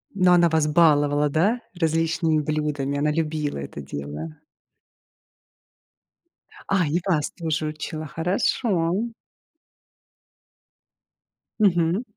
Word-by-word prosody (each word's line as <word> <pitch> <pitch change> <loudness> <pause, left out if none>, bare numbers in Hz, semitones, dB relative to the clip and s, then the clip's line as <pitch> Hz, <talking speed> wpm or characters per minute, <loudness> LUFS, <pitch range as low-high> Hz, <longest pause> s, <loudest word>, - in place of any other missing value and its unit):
Но 185 -2 +4
она 175 -1 +5
вас 160 -1 +2
баловала, 150 -2 +3
да, 195 +12 +1
различными 165 -2 +1
блюдами, 145 -2 -2
она 150 +1 +1
любила 155 -1 -2
это 70 +1 -7
дело? 75 +3 -7 2.3
А, 190 -5 +2
и 155 +4 +1
вас 160 -6 0
тоже 160 -3 -2
учила, 155 +1 -5
хорошо. 175 - 0 2.7
Мгм. 175 0 +2
155 Hz, 90 wpm, -24 LUFS, 145-170 Hz, 2.7 s, она